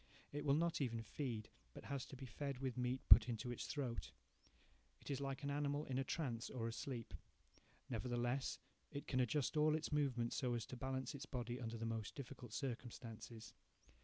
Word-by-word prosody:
It 145 0 -1
will 140 -1 +6
not 165 0 +2
even 115 -4 0
feed, 115 -3 -2 0.3
but - - -7
has 140 -2 -2
to - - -8
be 135 +1 -6
fed 140 +3 -3
with 130 -2 -1
meat 125 +1 0
put 115 +1 +11
into 120 +1 -1
its 120 - -3
throat. 130 -7 -2 0.9
It - - -6
is 140 0 0
like 135 0 -2
an 140 - 0
animal 145 +1 +1
in 130 -1 0
a - - +2
trance, 130 -6 -1
or 115 -3 -1
asleep. 115 -2 -3 0.7
Nevertheless 120 +2 0 0.3
it 145 -2 -4
can 130 - +1
adjust 140 +3 +2
all 155 0 +6
its 155 -1 -1
movements 130 -6 +2
so 125 -3 +2
as 115 - -1
to - - -6
balance 130 0 -2
its 140 - -6
body 120 0 -2
under 115 -1 -2
the 115 - -2
most 115 -2 -2
difficult 125 -4 -7
circumstances. 115 -2 -5
130 Hz, 190 wpm, -42 LUFS, 120-140 Hz, 0.9 s, put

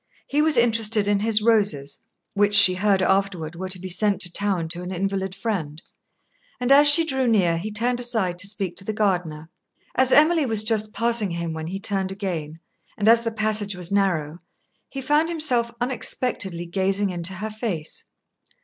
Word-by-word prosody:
He 290 +2 +1
was 310 -3 +2
interested 225 -3 +1
in 205 -1 +1
his 215 0 0
roses 200 -11 0 0.3
(which, 205 0 +2
she 200 -3 +10
heard 190 0 +1
afterward, 185 -5 -1
were 185 +2 -6
to 185 - 0
be 185 +1 -8
sent 195 +2 0
to 175 -1 -2
town 195 -5 0
to 175 +1 -5
an 180 +1 -7
invalid 190 0 -3
friend), 165 -10 -4 0.8
and 250 +1 -1
as 290 +1 +6
she 325 +3 +6
drew 265 -4 -1
near, 180 -7 +1
he 215 +5 -6
turned 240 +4 -1
aside 220 -8 0
to 200 - +1
speak 195 -4 -2
to 190 - -3
the 215 - -4
gardener. 170 -6 -2 0.4
As 260 0 +1
Emily 310 -1 +4
was 220 -2 -1
just 215 -1 0
passing 230 -1 0
him 170 -1 -5
when 160 0 -6
he 190 +3 -5
turned 195 -2 -2
again, 170 -6 -6 0.4
and 210 - -1
as 230 +1 +5
the 230 - -3
passage 215 -2 -2
was 180 0 -5
narrow, 175 -6 -1 0.5
he 270 - -7
found 295 +5 +1
himself 255 -8 +1
unexpectedly 225 -7 -3
gazing 195 +2 -1
into 175 +1 -2
her 215 +4 -6
face. 210 -8 -5
200 Hz, 185 wpm, -22 LUFS, 180-230 Hz, 0.8 s, she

